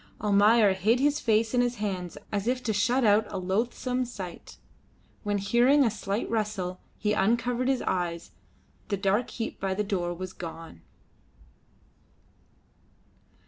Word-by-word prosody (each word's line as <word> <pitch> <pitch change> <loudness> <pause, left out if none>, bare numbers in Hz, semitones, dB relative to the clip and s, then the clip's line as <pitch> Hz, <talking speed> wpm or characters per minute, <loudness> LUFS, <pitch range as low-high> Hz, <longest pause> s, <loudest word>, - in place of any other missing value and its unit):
Almayer 210 0 +4
hid 215 +6 +2
his 290 +2 +2
face 225 0 +1
in 245 - +4
his 245 0 0
hands 190 -5 -4
as 205 +1 -2
if 250 +1 0
to 220 - 0
shut 245 +5 +2
out 210 0 +4
a - - -3
loathsome 235 +7 -1
sight. 195 -8 -8 0.6
When, 205 -1 -1
hearing 240 +8 +4
a 230 - +2
slight 200 +1 -3
rustle, 210 -5 -2 0.2
he 210 0 0
uncovered 235 +5 +1
his 265 -2 +1
eyes, 170 -2 -2 0.6
the 200 - -1
dark 200 +5 +1
heap 225 - -5
by 190 -1 -1
the 210 - 0
door 180 -4 -2
was 185 +1 -6
gone. 165 - -9
210 Hz, 140 wpm, -27 LUFS, 190-240 Hz, 0.6 s, Almayer